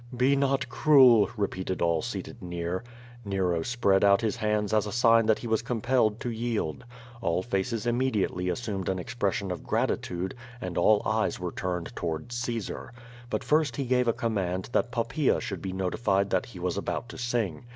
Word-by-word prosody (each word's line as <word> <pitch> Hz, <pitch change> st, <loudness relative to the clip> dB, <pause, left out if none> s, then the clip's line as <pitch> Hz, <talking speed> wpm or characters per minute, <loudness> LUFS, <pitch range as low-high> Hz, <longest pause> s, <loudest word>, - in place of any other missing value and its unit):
'* -, -, -7 dB
"Be 140 Hz, +1 st, +4 dB
not 135 Hz, -1 st, +1 dB
cruel,'' 125 Hz, -5 st, +6 dB
repeated 95 Hz, -2 st, -2 dB
all 85 Hz, -2 st, +2 dB
seated 120 Hz, +1 st, -6 dB
near. 85 Hz, +1 st, -3 dB, 0.4 s
Nero 95 Hz, -5 st, 0 dB
spread 100 Hz, -3 st, +2 dB
out 100 Hz, 0 st, +5 dB
his 115 Hz, +1 st, -1 dB
hands 105 Hz, -1 st, 0 dB
as 105 Hz, -1 st, +2 dB
a -, -, -4 dB
sign 115 Hz, -1 st, +4 dB
that 110 Hz, -, +4 dB
he -, -, -9 dB
was 110 Hz, -1 st, +1 dB
compelled 120 Hz, -2 st, +1 dB
to 120 Hz, -, -2 dB
yield. 115 Hz, -4 st, -2 dB, 0.4 s
All 85 Hz, -2 st, 0 dB
faces 115 Hz, +1 st, -2 dB
immediately 115 Hz, -7 st, 0 dB
assumed 100 Hz, -1 st, -3 dB
an 95 Hz, -, 0 dB
expression 100 Hz, 0 st, -2 dB
of 90 Hz, -, -4 dB
gratitude, 90 Hz, +2 st, -1 dB, 0.3 s
and 90 Hz, -7 st, -5 dB
all 105 Hz, +4 st, +4 dB
eyes -, -, 0 dB
were -, -, -3 dB
tumea 90 Hz, -2 st, -3 dB
towards 85 Hz, +9 st, -4 dB
Caesar. 120 Hz, -3 st, -4 dB, 0.4 s
But -, -, -2 dB
first 150 Hz, -5 st, +2 dB
he 135 Hz, -, -2 dB
gave 125 Hz, 0 st, +2 dB
a -, -, +5 dB
com 115 Hz, -1 st, -2 dB
mand 95 Hz, -1 st, -2 dB
that 120 Hz, -, +1 dB
Poppaea 125 Hz, +4 st, +1 dB
should 95 Hz, -4 st, -5 dB
be 95 Hz, -, -4 dB
notified 95 Hz, +1 st, 0 dB
that 95 Hz, -, +1 dB
he 110 Hz, -, -11 dB
was 90 Hz, +1 st, -2 dB
about 115 Hz, -, -3 dB
to -, -, -9 dB
sing. 120 Hz, -6 st, -2 dB
105 Hz, 185 wpm, -28 LUFS, 95-120 Hz, 0.4 s, cruel